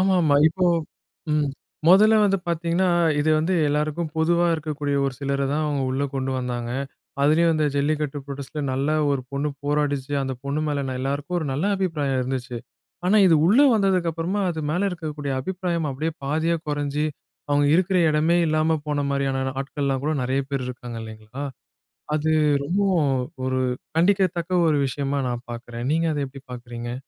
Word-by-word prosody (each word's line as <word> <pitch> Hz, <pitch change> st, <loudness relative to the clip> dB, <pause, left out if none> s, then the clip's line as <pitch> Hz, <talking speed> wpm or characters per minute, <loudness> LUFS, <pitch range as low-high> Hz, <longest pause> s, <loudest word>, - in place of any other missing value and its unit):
ஆமாமா. 180 Hz, -6 st, +3 dB
இப்போ 180 Hz, +3 st, 0 dB, 0.7 s
ம். 150 Hz, -1 st, +2 dB, 0.4 s
மொதல்ல 210 Hz, +5 st, +7 dB
வந்து 195 Hz, -1 st, +2 dB
பார்த்தீங்கன்னா, 170 Hz, +2 st, +1 dB, 0.3 s
இது 155 Hz, +2 st, +2 dB
வந்து 165 Hz, +4 st, +1 dB
எல்லாருக்கும் 150 Hz, +2 st, -1 dB
பொதுவா 170 Hz, +2 st, +3 dB
இருக்கக்கூடிய 150 Hz, -2 st, -2 dB
ஒரு 135 Hz, -2 st, -1 dB
சிலர 140 Hz, -1 st, -1 dB
தான் 155 Hz, +2 st, 0 dB
அவங்க 145 Hz, -2 st, -1 dB
உள்ள 135 Hz, +2 st, 0 dB
கொண்டு 135 Hz, 0 st, -1 dB
வந்தாங்க. 120 Hz, -1 st, -3 dB, 0.5 s
அதுலயும் 165 Hz, +3 st, +4 dB
அந்த 155 Hz, -1 st, +1 dB
ஜல்லிக்கட்டு 145 Hz, 0 st, 0 dB
புரோடெஸ்ட்டில 140 Hz, +1 st, -5 dB
நல்லா 140 Hz, +4 st, 0 dB, 0.2 s
1 140 Hz, -2 st, 0 dB
பொண்ணு 140 Hz, +2 st, -1 dB, 0.2 s
போராடிச்சு. 145 Hz, -2 st, 0 dB
அந்த 135 Hz, -1 st, -3 dB
பொண்ணு 140 Hz, +2 st, -1 dB
மேல 145 Hz, -1 st, -1 dB
ந 130 Hz, -, -3 dB
எல்லாருக்கும் 140 Hz, +6 st, -2 dB
ஒரு 160 Hz, -, -3 dB
நல்ல 140 Hz, +6 st, -1 dB
அபிப்பிராயம் 150 Hz, -8 st, -1 dB
இருந்துச்சு. 125 Hz, -1 st, -4 dB, 0.5 s
ஆனா 200 Hz, +4 st, +4 dB
இது 170 Hz, -, +6 dB
உள்ள 215 Hz, +9 st, +5 dB
வந்ததுக்கப்பறமா, 185 Hz, -2 st, +1 dB
அது 160 Hz, -2 st, -4 dB
மேல 185 Hz, +5 st, +1 dB
இருக்கக்கூடிய 150 Hz, -5 st, -4 dB
அபிப்பிராயம் 175 Hz, 0 st, -2 dB
அப்படியே 155 Hz, +5 st, -2 dB
பாதியா 160 Hz, +4 st, +1 dB
கொறைஞ்சு 145 Hz, 0 st, -1 dB, 0.5 s
அவங்க 145 Hz, 0 st, +3 dB
இருக்கிற 185 Hz, +2 st, +2 dB
இடமே 155 Hz, +3 st, +2 dB
இல்லாம 155 Hz, +1 st, +2 dB
போன 145 Hz, -1 st, 0 dB
மாரியான 135 Hz, -1 st, 0 dB, 0.2 s
ஆட்கள்லாம் 135 Hz, -1 st, -2 dB
கூட 155 Hz, -, +1 dB
நெறைய 130 Hz, +2 st, 0 dB
பேர் 135 Hz, -2 st, -2 dB
இருக்காங்க 120 Hz, -1 st, -7 dB
இல்லைங்களா? 110 Hz, +5 st, -8 dB, 0.7 s
அது 155 Hz, +1 st, 0 dB, 0.3 s
ரொம்பவும் 175 Hz, -2 st, +1 dB, 0.3 s
ஒரு 130 Hz, 0 st, 0 dB, 0.4 s
கண்டிக்கத்தக்க 185 Hz, -1 st, +2 dB, 0.2 s
ஒரு 150 Hz, -, +2 dB
விஷயமா 140 Hz, +1 st, -2 dB
நான் 120 Hz, 0 st, -4 dB
பார்க்குறேன். 120 Hz, 0 st, -6 dB
நீங்க 165 Hz, +1 st, +1 dB
அத 145 Hz, -, -2 dB
எப்படி 135 Hz, 0 st, -12 dB
பார்க்குறீங்க? 120 Hz, -1 st, -6 dB
150 Hz, 155 wpm, -24 LUFS, 135-170 Hz, 0.7 s, மொதல்ல